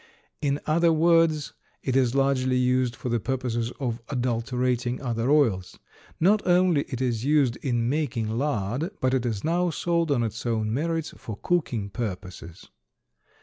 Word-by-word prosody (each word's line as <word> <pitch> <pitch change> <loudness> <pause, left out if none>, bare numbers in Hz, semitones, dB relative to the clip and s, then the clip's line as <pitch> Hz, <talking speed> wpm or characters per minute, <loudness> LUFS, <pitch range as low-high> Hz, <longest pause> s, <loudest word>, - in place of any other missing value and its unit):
In 140 -1 0
other 165 +2 +3
words, 165 -2 +3 0.3
it 130 - -1
is 130 -2 +2
largely 135 -2 +2
used 125 -1 +1
for 125 - -5
the 120 0 +1
purposes 120 -1 -2
of 120 -4 -3
adulterating 125 -1 -1
other 120 -1 -1
oils. 115 -12 +2 0.4
Not 205 +5 +4
only 175 -4 +3
is 120 -3 -2
it - - -2
used 145 -5 +3
in 120 -3 -1
making 135 -5 -1
lard, 120 - -1
but 130 0 +1
it 125 -2 +1
is 110 -4 -3
now 175 +2 +1
sold 170 0 0
on 130 -5 +2
its 110 -1 -4
own 110 -2 -1
merits 160 +3 -2
for 110 -3 -8
cooking 120 - -1
purposes. 90 -6 -6
130 Hz, 150 wpm, -26 LUFS, 115-150 Hz, 0.4 s, Not